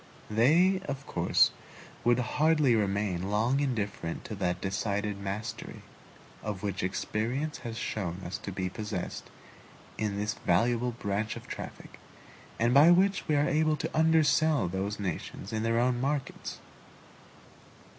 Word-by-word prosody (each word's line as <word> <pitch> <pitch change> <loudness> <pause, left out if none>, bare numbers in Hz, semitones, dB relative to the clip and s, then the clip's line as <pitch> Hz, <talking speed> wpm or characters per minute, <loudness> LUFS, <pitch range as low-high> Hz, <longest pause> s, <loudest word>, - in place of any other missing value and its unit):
They, 165 - +4
of 135 0 -4
course, - - +3 0.5
would 120 0 +4
hardly 150 +2 +3
remain 100 -3 0
long 115 +6 +2
indifferent 105 -11 -2
to 110 - -6
that 90 -2 -1
decided 100 +1 -2
mastery, 105 +3 -5 0.6
of 105 -2 -5
which 100 -2 -2
experience 120 +10 -2
has 115 -1 -6
shown 95 -6 -3
us 95 +3 -4
to 100 - -6
be 95 0 -2
possessed 105 -1 -5 0.7
in 105 -2 -1
this 105 0 -1
valuable 120 +7 +1
branch 105 -1 -2
of - - -9
traffic, - - -8 0.6
and 120 +1 +2
by 145 +5 +8
which 190 +3 +3
we 155 - +2
are 145 +1 +3
able 155 0 +2
to - - -4
undersell 155 - +4
those 95 +3 -3
nations 95 +2 -5
in 110 - 0
their 115 +1 +1
own 125 0 +1
markets. 140 0 -2
110 Hz, 135 wpm, -29 LUFS, 100-140 Hz, 0.7 s, by